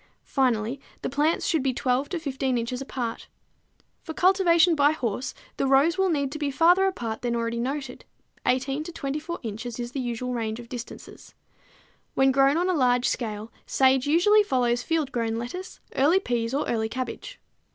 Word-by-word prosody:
Finally, 250 -1 0 0.2
the - - -2
plants 295 +4 +1
should 320 -4 +1
be 260 -2 0
12 255 +3 0
to 360 - -2
15 270 -5 -1
inches 245 +2 -3
apart. 245 -4 -4 0.7
For 320 - -8
cultivation 360 -2 +4
by 290 -1 +4
horse 250 -2 -3 0.2
the 275 - +1
rows 275 +5 +4
will 385 -1 +3
need 280 -5 0
to 305 - -6
be 290 -2 -1
farther 350 +7 +4
apart 230 -12 -3
than 240 -1 -1
already 230 0 -2
noted; 270 +1 -4 0.4
18 270 +3 0
to 345 - -6
24 305 +3 -4
inches 230 +2 -5
is 240 0 -4
the 275 - -4
usual 250 0 -3
range 225 -1 -3
of 235 -1 -11
distances. 240 -2 -9 0.8
When 270 0 +4
grown 275 +3 +4
on 355 +2 +1
a 370 - +2
large 250 -5 +2
scale, 220 -1 -3 0.2
sage 265 0 +3
usually 365 +8 +5
follows 245 -10 +1
field 310 -1 -1
grown 230 -2 -1
lettuce, 245 +12 -6 0.2
early 305 +8 +4
peas 235 -9 -2
or 280 +3 -1
early 220 -1 -1
cabbage. 260 - -6
265 Hz, 175 wpm, -26 LUFS, 240-310 Hz, 0.8 s, usually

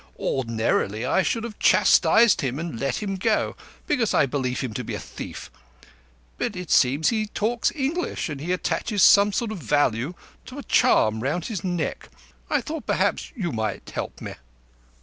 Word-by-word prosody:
Ordinarily, 115 -3 -1
I 190 - +2
should 225 +4 -1
have 230 -2 -7
chastised 230 -2 +5
him 135 -2 -2
and 165 -7 -5
let 135 - -2
him 195 -2 -3
go, 215 +3 0 0.3
because 240 -9 +1
I - - +4
believe 130 -2 -2
him 125 -5 -4
to 125 - -4
be - - -5
a - - -5
thief. - - -9 0.9
But - - -2
it 180 -2 -6
seems 140 +5 +4
he 220 -2 -1
talks 230 +3 0
English, 300 - -2
and 145 -4 -6
he 170 +4 -3
attaches 200 +2 0
some 200 +1 +7
sort 220 +2 -2
of 215 - -5
value 145 0 0 0.3
to 260 - -9
a 285 - -6
charm 110 - +3
round 150 +7 -2
his 205 -7 -4
neck. 175 -3 -3 0.4
I - - +1
thought 315 0 -6
perhaps - - 0
you 185 -9 -2
might 110 -4 -4
help - - -5
me." - - -6
175 Hz, 175 wpm, -24 LUFS, 130-220 Hz, 0.9 s, some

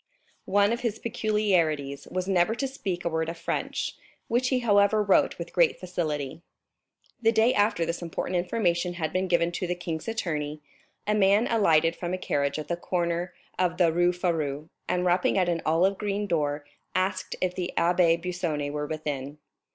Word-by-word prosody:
One 205 +3 +4
of 235 - -2
his 230 -3 -2
peculiarities 175 -12 0
was 185 0 -2
never 190 +3 +2
to 270 +3 -1
speak 195 -9 -4
a - - +2
word 160 0 -1
of 165 - -5
French, - - -3 0.3
which 245 +2 +2
he 255 -2 +1
however 210 -1 +4
wrote 200 -2 +3
with - - -7
great - - +3
facility." 155 -5 -3 0.8
The 225 -1 +4
day 225 +2 +4
after 205 -5 +2
this 170 +2 -3
important 175 +2 -3
information 175 -1 0
had 160 -3 -3
been 185 +1 0
given 170 -1 +2
to 180 +1 -3
the 180 - -1
king's 170 -1 -5
attorney, 155 -9 -2 0.5
a 210 - +1
man 205 +2 +4
alighted 165 -8 +3
from 175 +1 -3
a - - -4
carriage 140 -5 -1
at 155 - -5
the 175 - -1
corner 175 0 -2 0.2
of 180 -2 +1
the 170 -3 +3
Rue 175 +1 +3
Férou, 160 -4 -2 0.2
and 180 0 +1
rapping 180 +2 +2
at 185 -2 +3
an 170 -1 0
olive 180 +5 +2
green 205 0 -1
door, 150 -5 -1 0.3
asked 185 0 -1
if 185 -1 0
the 180 -1 -3
Abbé 170 -1 +4
Busoni 170 -5 -2
were 150 0 -3
within. 145 -2 -4
175 Hz, 180 wpm, -27 LUFS, 165-200 Hz, 0.8 s, One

